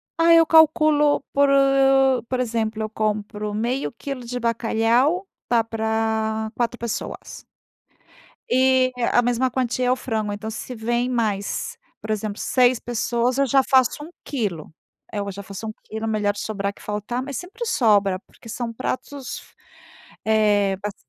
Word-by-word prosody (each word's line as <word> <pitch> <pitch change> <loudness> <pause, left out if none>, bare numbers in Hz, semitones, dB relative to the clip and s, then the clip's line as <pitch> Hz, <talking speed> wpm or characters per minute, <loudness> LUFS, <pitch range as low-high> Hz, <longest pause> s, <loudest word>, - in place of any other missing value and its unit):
Ah, 335 0 +5
eu 330 0 +7
calculo 310 -2 +4
por 280 0 +4 0.8
por 255 -1 -2
exemplo, 225 -2 -1
eu 215 - -3
compro 210 -1 -2
meio 240 +6 -1
quilo 260 +1 -6
de 245 +1 -4
bacalhau, 235 - +1 0.2
dá 235 -2 +3
para 220 0 -1
quatro 240 0 -1
pessoas. 235 -2 -5 1.1
E 260 0 +3 0.2
a 245 - +5
mesma 245 +1 +1
quantia 250 0 -1
é - - +3
o - - +3
frango, 220 -5 -3
então, 215 +2 -5
se 250 +3 -6
vem 240 +2 -1
mais, 215 -5 -2 0.2
por 215 - -10
exemplo, 215 -1 -3
6 250 -1 +3
pessoas, 240 +1 -1
eu 275 - +3
já 270 +1 +4
faço 260 +2 +2
1 325 - -11
quilo. 195 - -4 0.4
Eh, 210 - -3
eu 200 0 -3
já 200 +1 -8
faço 200 +3 -7
1 215 - -5
quilo 220 +1 -5
melhor 210 -2 0
sobrar 205 -1 -3
que - - -18
faltar, 210 +4 -3
mas 275 -2 -5
sempre 440 +7 -6
sobra, 205 - +3
porque 230 - -18
são 230 +1 -4
pratos 260 +2 -5 0.8
eh, 205 -3 +3
bas 205 -1 -4
230 Hz, 155 wpm, -23 LUFS, 215-255 Hz, 1.1 s, eu